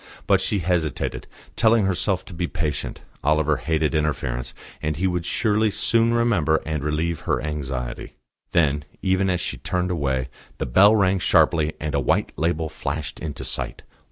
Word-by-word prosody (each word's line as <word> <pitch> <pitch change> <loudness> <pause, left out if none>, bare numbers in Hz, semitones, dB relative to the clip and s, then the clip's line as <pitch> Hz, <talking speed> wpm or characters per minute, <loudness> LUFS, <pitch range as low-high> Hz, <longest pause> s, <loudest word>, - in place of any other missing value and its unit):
But - - +3
she 105 - +1
hesitated, 85 -5 -1 0.3
telling 110 -2 +4
herself 95 0 0
to 100 - -10
be 85 +1 -2
patient. 75 -3 -3 0.2
Oliver 75 0 +2
hated 80 +4 0
interference, 70 -6 -1 0.3
and 75 -1 -1
he 95 - 0
would 90 -2 -1
surely 110 -1 +2
soon 115 +3 +2
remember 105 -10 +2
and 75 -2 -2
relieve 80 +2 -1
her - - -1
anxiety. 70 -4 -4 0.4
Then, 75 -4 +2 0.2
even 95 0 +2
as 90 -1 0
she - - -3
turned 90 0 -2
away, 65 -6 -1 0.3
the - - -2
bell 100 - +6
rang 95 -2 +3
sharply, 80 -3 +3
and 75 -1 -3
a 70 - +2
white 65 - +1
label 80 0 0
flashed 75 -1 -5
into 75 -4 -5
sight. - - -3
80 Hz, 160 wpm, -23 LUFS, 75-95 Hz, 0.4 s, bell